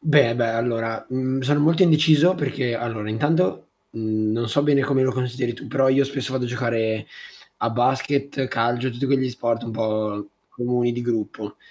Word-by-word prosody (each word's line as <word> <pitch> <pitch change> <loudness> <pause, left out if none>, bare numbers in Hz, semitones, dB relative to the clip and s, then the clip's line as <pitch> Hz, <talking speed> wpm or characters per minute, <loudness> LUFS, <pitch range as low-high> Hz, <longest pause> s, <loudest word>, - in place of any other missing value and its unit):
Beh, 145 -7 +4
beh, 120 -2 +1
allora, 115 -1 -2
mhmm, 130 +1 -1
sono 145 +3 +1
molto 165 +5 +4
indeciso 160 +1 +5
perché 135 -6 -2
allora 115 -2 -4
intanto, 145 - 0 0.2
mhmm, 110 -1 -2
non 115 0 -1
so 145 +5 +1
bene 145 -2 +3
come 135 -1 +2
lo 130 - +2
consideri 125 -1 -2
tu, 120 - -10
però 135 -1 +2
io 135 +1 +4
spesso 135 -1 -4
vado 130 -1 -1
a - - -3
giocare 115 -3 -1 0.5
a 115 - 0
basket, 135 +3 0
calcio, 120 +2 0
tutti 125 +3 -3
quegli 130 -1 +1
sport 120 -1 -2
un 115 - -5
po' 110 -2 -2 0.2
comuni, 120 0 0
di 120 0 -4
gruppo. 110 -3 -3
125 Hz, 180 wpm, -23 LUFS, 115-140 Hz, 0.5 s, indeciso